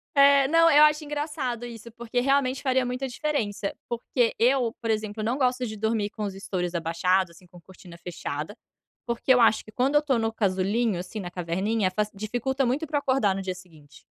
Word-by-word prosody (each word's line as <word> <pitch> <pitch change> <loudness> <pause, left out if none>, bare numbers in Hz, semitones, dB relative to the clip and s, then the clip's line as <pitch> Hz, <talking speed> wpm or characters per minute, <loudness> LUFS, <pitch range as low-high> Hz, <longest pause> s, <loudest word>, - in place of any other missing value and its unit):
Eh, 280 -1 +6
não, 330 +3 +5
eu 295 +1 +7
acho 300 0 +4
engraçado 290 -5 -3
isso, 235 -1 -10
porque 235 +1 -3
realmente 270 0 +1
faria 260 -2 +2
muita 250 +2 -3
diferença. 235 -8 -2
Porque 235 0 0
eu, 245 -1 +2
por 230 - -3
exemplo, 215 0 -2
não 240 +5 0
gosto 255 -1 +1
de 215 -1 -6
dormir 220 -1 0
com 215 -1 -7
os 200 - -3
estoures 190 -2 -4
abaixados, 170 +2 +1
assim, 175 +2 -18
com 175 -1 -16
cortina 180 -1 -14
fechada, 165 0 -6 0.5
porque 240 +2 +2
eu 250 - +4
acho 225 -1 +4
que 215 - -14
quando 265 +6 0
eu 295 - +6
estou 270 -5 +1
no 225 0 0
casulinho, 200 +1 0
assim, 190 +4 -6
na 180 -3 -6
caverninha, 185 +4 -1
faci 210 +2 -1
dificulta 245 +6 -1
muito 270 +6 0
para 300 - -1
eu 285 - -1
acordar 260 -8 +1
no 195 - -3
dia 185 -1 -4
seguinte. 155 -6 -17
225 Hz, 205 wpm, -26 LUFS, 190-260 Hz, 0.5 s, eu